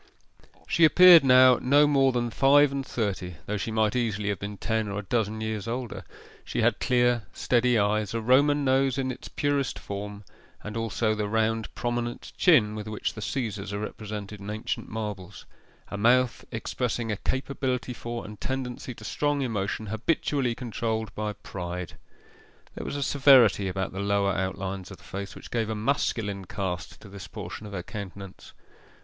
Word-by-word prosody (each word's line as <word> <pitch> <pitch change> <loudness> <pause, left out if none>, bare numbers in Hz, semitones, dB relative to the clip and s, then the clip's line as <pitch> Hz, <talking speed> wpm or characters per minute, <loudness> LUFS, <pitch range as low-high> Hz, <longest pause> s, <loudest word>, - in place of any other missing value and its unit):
She 170 - +2
appeared 175 0 +9
now 130 -1 +7
no 145 +3 +5
more 135 -2 +4
than 120 -1 -1
five 140 +3 +5
and 140 0 -2
thirty, 100 -8 -3
though 105 - -2
she 100 - -3
might 110 0 +1
easily 105 -4 -1
have 100 -3 -2
been 100 0 -6
ten 110 +2 -1
or 100 0 -4
a 105 - -3
dozen 110 +1 -1
years 110 -1 -3
older. 120 0 -4 0.4
She - - -2
had - - +2
clear 120 -4 +2
steady 125 -1 +2
eyes, 105 0 +1
a - - 0
Roman 140 +5 +3
nose 135 -1 +2
in 130 -1 -1
its 125 - -9
purest 145 -2 -1
form, 100 +1 -6 0.4
and 105 0 -6
also 115 -1 0
the 105 -1 -2
round 110 +1 0
prominent 120 0 -3
chin 125 - +4
with 105 0 -6
which 110 -1 -3
the 110 - -8
Caesars 105 -4 -3
are - - -2
represented 105 -1 -6
in 100 +1 -8
ancient 110 +1 -4
marbles; 105 -4 -6 0.4
a 100 - -5
mouth 125 +3 +3
expressing 115 0 -2
a 105 - -2
capability 130 -1 -2
for 120 0 -6
and 105 0 -10
tendency 130 -2 -4
to 110 - -13
strong 145 +4 0
emotion, 110 -2 -2
habitually 120 +3 0
controlled 110 -3 -3
by 105 0 -3
pride. 90 -3 -6 0.8
There - - -7
was - - -4
a 140 - -1
severity 130 -9 +5
about 95 +1 -2
the 95 - -5
lower 100 0 +1
outlines 95 0 -3
of 95 - -10
the - - -20
face 100 +1 -6
which - - -11
gave 115 -2 -1
a 110 - -2
masculine 105 -4 -1
cast 90 -1 -4
to - - -12
this 100 -1 -9
portion 105 0 -7
of 100 - -10
her 90 -3 -4
countenance. 100 -1 -9
110 Hz, 175 wpm, -27 LUFS, 100-125 Hz, 0.8 s, appeared